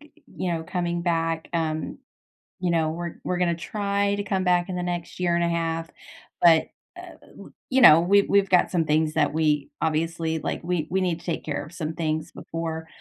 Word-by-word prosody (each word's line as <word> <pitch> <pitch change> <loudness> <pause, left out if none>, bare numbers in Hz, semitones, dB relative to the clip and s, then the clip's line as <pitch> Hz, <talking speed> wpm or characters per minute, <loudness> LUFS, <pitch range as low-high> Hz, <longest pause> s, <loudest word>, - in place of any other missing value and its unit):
y 300 0 -18 0.3
you 180 -2 -1
know, 165 -1 -2
coming 175 0 -2
back, 165 -2 -1
um, 160 -2 -2 0.6
you 180 - +1
know, 160 -2 +1
we're 170 +1 -5
we're 180 - -1
gonna 175 -1 +1
try 200 +3 -1
to 205 - -3
come 195 -1 -1
back 180 0 +2
in 180 - -3
the - - -2
next 175 -1 -4
year 175 -1 +1
and 170 - +1
a 170 - +1
1/2, 165 -1 -2 0.5
but, 165 -2 +5 0.3
uh, - - -9 0.3
u - - -12
uh, - - -15 0.2
you 265 0 +3
know, 160 -10 +9
we 195 +4 +4
we've 200 -1 +2
got 180 - +3
some 165 -3 +1
things 155 +1 +1
that - - +2
we 150 -2 +1
obviously 160 +1 -1
like, - - -3
we 170 -3 -1
we 190 +1 0
need 175 -2 -1
to - - -17
take 170 - -3
care 150 - -3
of 155 - -14
some 160 -3 -4
things 155 -1 -2
before, 160 -1 -5
170 Hz, 215 wpm, -25 LUFS, 160-180 Hz, 0.6 s, know